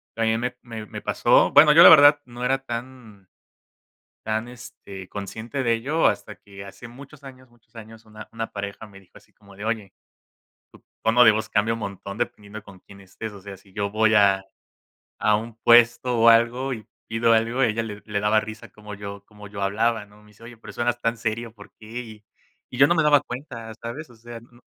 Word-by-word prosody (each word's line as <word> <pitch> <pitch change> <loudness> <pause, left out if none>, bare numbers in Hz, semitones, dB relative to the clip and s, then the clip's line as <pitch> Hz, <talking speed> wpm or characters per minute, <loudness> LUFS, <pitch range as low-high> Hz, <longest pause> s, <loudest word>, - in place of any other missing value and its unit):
también 115 0 0
me 125 +1 -3
me 110 -3 -9
me - - -9
pasó, - - +2
bueno, 150 -1 +7
yo 170 +2 +8
la - - +11
verdad 145 -1 +7
no 120 0 -9
era 135 +1 +1
tan 120 -5 -9 1.0
tan 110 +2 -2
este, 120 -6 -11
consciente 110 +6 -6
de 115 -2 +1
ello, 140 +8 0
hasta - - -2
que 100 -1 -13
hace 110 +4 -12
muchos 140 +3 -14
años, 130 -2 -14
muchos 120 0 -26
años, 110 0 -13
una 110 0 -12
una 115 0 -5
pareja 100 +1 -7
me 100 -1 -16
dijo 95 - -23
así - - -28
como 100 -2 -19
de 105 +3 -8
oye, 105 -4 -3 1.1
tu - - -1
tono 125 +1 +5
de 110 - +7
voz 110 +1 -3
cambia 110 +2 0
un 115 - -7
montón 100 0 -7
dependiendo 110 -3 -6
con 100 -3 -15
quién 100 +1 -17
estés, 105 +3 -9
o 100 - -12
sea, 100 -1 -9
si 95 0 -23
yo 100 -1 -3
voy 110 +1 +2
a 100 -2 +4 0.8
a 105 - +3
un 115 +1 -6
puesto 120 +1 +4
o 115 +1 +6
algo 120 +3 +2
y 110 -3 -10 0.2
pido 115 +1 +2
algo, 115 +4 0
ella 115 -2 +1
le 105 -2 -8
le 105 -2 -3
daba 105 +1 +2
risa 110 0 -9
como 105 -1 -11
yo 100 0 -9
como 105 -1 -13
yo 100 0 -8
hablaba, 110 +2 0
¿no? 105 +1 -21
Me 105 - -21
dice, 105 +2 -23
oye, 120 -1 -12
pero - - -12
eso - - -19
suenas 120 0 -1
tan 115 0 -1
serio, 115 0 -4
¿por 100 -2 -16
qué? 110 - -14
Y 110 -2 -9 0.5
y 125 - -8
yo 140 - +7
no 175 - +2
me 160 - +2
daba 145 -1 +4
cuenta, 120 -4 -8
¿sabes? 130 +5 -7
O 120 - -17
sea, 115 +1 -11
no, 120 +1 -22
115 Hz, 220 wpm, -23 LUFS, 105-120 Hz, 1.1 s, la